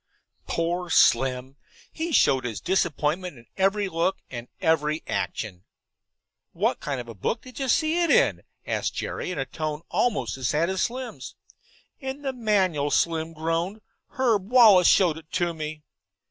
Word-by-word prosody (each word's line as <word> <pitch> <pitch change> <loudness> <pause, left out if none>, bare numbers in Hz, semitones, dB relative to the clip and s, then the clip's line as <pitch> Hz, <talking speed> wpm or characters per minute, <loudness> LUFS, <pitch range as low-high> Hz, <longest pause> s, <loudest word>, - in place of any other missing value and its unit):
Poor 175 +1 -1
Slim! 130 -1 +3 0.3
He 330 +1 -4
showed 135 - +4
his 115 -3 -4
disappointment 175 -2 -1
in 120 - -16
every 195 +1 +1
look 170 +2 0
and 120 -1 -6
every 160 -2 +1
action. 95 -5 -3 0.9
"What - - 0
kind 140 -3 -3
of 120 - -7
a 115 - -8
book 115 - -3
did 255 +1 -11
you 270 - -1
see 315 +5 +2
it 340 - +1
in?" 480 +1 +4 0.2
asked - - -2
Jerry, - - -4
in 180 - -4
a 135 - -1
tone 155 +3 -4
almost 135 - 0
as 130 -2 -2
sad 165 +4 +1
as 190 - -1
Slim's. 250 +1 -4 0.6
"In 265 0 -6
the 270 -1 -2
manual," 190 - +1
Slim 165 +1 +1
groaned. 165 +6 -2 0.3
"Herb 220 -7 0
Wallace 220 -8 +7
showed 170 -5 +4
it 160 -1 -21
to 175 -2 0
me." 155 -1 -6
170 Hz, 160 wpm, -25 LUFS, 145-210 Hz, 0.9 s, Wallace